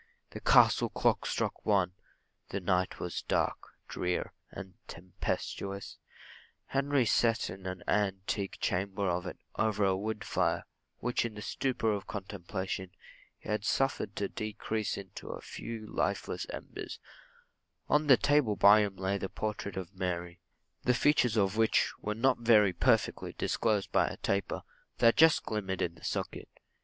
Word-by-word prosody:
The - - -7
castle - - +5
clock - - +1
struck - - -2
one 95 -4 +2 0.6
the 100 - -2
night 90 0 0
was 90 - -3
dark, - - -1 0.2
drear, 90 0 -2 0.2
and 95 -2 -9
tempestuous. 95 +2 -4 0.7
Henry 140 -1 +1
set 115 0 +2
in 95 -1 -8
an 95 -1 -5
antique 100 -1 0
chamber 100 +2 -1
of 90 +1 -1
it, - - -6 0.2
over 105 -2 +2
a 95 -1 +3
wood 105 +2 -3
fire, 85 -4 0 0.3
which, 125 +1 0
in 115 -2 -4
the 105 - -7
stupor 125 -4 0
of 100 -2 -3
contemplation, 95 -1 -4 0.5
he - - -14
had 105 -1 0
suffered 125 -5 0
to 100 - -1
decrease 110 +1 -3
into 100 -2 -9
a - - -5
few 115 -1 -7
lifeless - - -2
embers; - - -7 0.9
on 150 0 +3
the 130 -3 +8
table 145 -7 +3
by 100 +2 +7
him 100 -2 0
lay 95 +1 -1
the 95 - -3
portrait 105 -2 -4
of 95 +1 -5
Mary 90 -2 -3 0.4
the 125 - +3
features 125 -5 +3
of 100 0 +2
which 110 0 +3
were 105 0 -3
not 125 +3 +2
very 110 -5 +5
perfectly 115 +5 +1
disclosed 105 -3 0
by - - +3
a - - -5
taper, 100 0 -1 0.3
that 115 -1 +5
just 160 0 +6
glimmered 95 -4 -3
in 85 - -1
the - - -18
socket. - - -3
100 Hz, 150 wpm, -31 LUFS, 95-110 Hz, 0.9 s, the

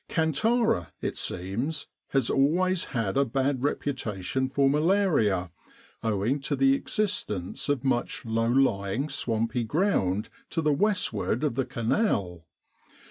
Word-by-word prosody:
Kantara, 165 - +1
it - - -3
seems, 115 - -3 0.2
has 135 -4 +1
always 175 +6 +2
had 115 -4 -2
a 140 - +5
bad 135 +1 0
reputation 130 -4 -2
for 140 0 +2
malaria, 145 - +2 0.5
owing 110 +5 0
to 140 +1 -1
the 135 0 +4
existence 140 - -2
of 145 -4 0
much 125 -3 -1
low 115 0 0
lying, 120 0 +1
swampy 115 -2 -1
ground 110 - +1 0.2
to 165 - -2
the 150 -1 +3
westward 185 - 0
of 150 - +1
the 135 +1 -1
Canal. 100 - -1
135 Hz, 125 wpm, -27 LUFS, 110-150 Hz, 0.5 s, a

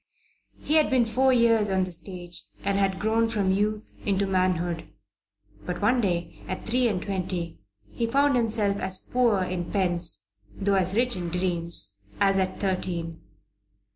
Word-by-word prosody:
He 310 - +1
had 310 - +4
been 255 -3 +3
four 260 +4 +3
years 230 -4 +4
on 190 -1 +2
the 185 - -4
stage 175 0 -4 0.2
and 200 0 0
had 195 -1 +1
grown 225 +2 +2
from 205 -4 +1
youth 210 +2 -1
into 200 -1 +1
manhood. 180 -3 0 0.8
But 180 -1 -4
one 240 +4 +3
day 175 -4 -2
at 185 - -5
three 245 +2 +2
and 200 -5 0
twenty 180 -3 -3 0.3
he 230 - -2
found 280 +3 +3
himself 215 -4 +1
as 190 -1 +1
poor 230 -3 +1
in 180 -2 -4
pence, 175 -4 -1 0.3
though 200 +1 0
as 190 0 +2
rich 245 +1 +2
in 175 -2 -3
dreams, 170 - -2 0.2
as 195 -1 +3
at 185 0 -1
thirteen. 175 -4 -2
195 Hz, 160 wpm, -26 LUFS, 180-225 Hz, 0.8 s, had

